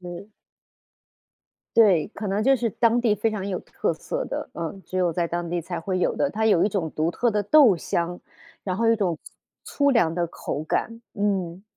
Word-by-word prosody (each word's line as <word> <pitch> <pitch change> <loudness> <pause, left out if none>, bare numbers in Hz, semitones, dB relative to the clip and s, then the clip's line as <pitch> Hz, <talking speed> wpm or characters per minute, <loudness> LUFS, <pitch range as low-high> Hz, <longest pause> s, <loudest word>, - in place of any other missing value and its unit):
是。 180 +4 -9 1.5
对， 200 -9 +5
可 210 0 -7
能 200 +2 0
就 270 +4 +5
是 240 -3 0
当 230 +3 +2
地 230 -3 +2
非 225 +1 0
常 200 -2 -4
有 185 -2 -2
特 - - -2
色 - - -4
的， - - -4
嗯， 170 +4 -6
只 185 - -4
有 180 -2 +2
在 170 +1 -1
当 170 0 -3
地 175 +1 -1
才 170 +1 -5
会 185 +2 -2
有 180 - +1
的。 285 - +1
它 220 -3 -2
有 205 -6 +4
一 205 - +3
种 180 -6 -2
独 155 +2 -1
特 240 +6 0
的 210 -1 0
豆 245 -1 +6
香， 170 +1 -3 0.4
然 185 -2 -2
后 230 - +1
有 225 - +5
一 230 - +2
种 175 -6 -1 0.5
粗 285 - -2
粗 280 - +6
粮 175 -10 +2
的 175 0 0
口 155 -2 -5
感， 230 +8 -2
嗯。 190 -3 -1
195 Hz, 230 characters per minute, -24 LUFS, 175-225 Hz, 1.5 s, 豆